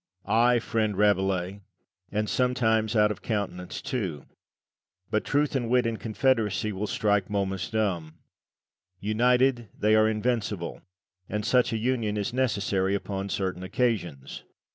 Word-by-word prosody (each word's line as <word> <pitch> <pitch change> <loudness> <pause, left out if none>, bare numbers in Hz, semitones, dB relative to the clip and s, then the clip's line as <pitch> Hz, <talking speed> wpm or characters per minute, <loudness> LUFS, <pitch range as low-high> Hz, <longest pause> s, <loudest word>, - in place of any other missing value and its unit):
Lucian. 105 - -2
Ay, 120 +2 +5
friend 110 -3 -1
Rabelais, 95 -1 +1 0.5
and 105 +1 -1
sometimes 115 -3 +1
out 105 -1 +4
of - - -6
countenance 100 -5 -3
too. 95 - -3 0.9
But - - +1
Truth 145 0 0
and 120 -3 -1
Wit 125 0 +3
in 115 -1 -1
confederacy 110 -3 0
will 100 +3 -3
strike 105 -3 +1
Momus 95 -2 -2
dumb. 90 -8 -1 0.8
United 120 +3 +2
they 105 +1 +3
are 110 0 +5
invincible, 110 -5 -2 0.5
and 105 0 -2
such 125 -1 +3
a 115 - 0
union 110 -2 0
is 105 +3 -2
necessary 100 -6 +1
upon 100 0 -4
certain 95 -2 -2
occasions. 95 - -2
105 Hz, 135 wpm, -27 LUFS, 95-120 Hz, 0.9 s, Ay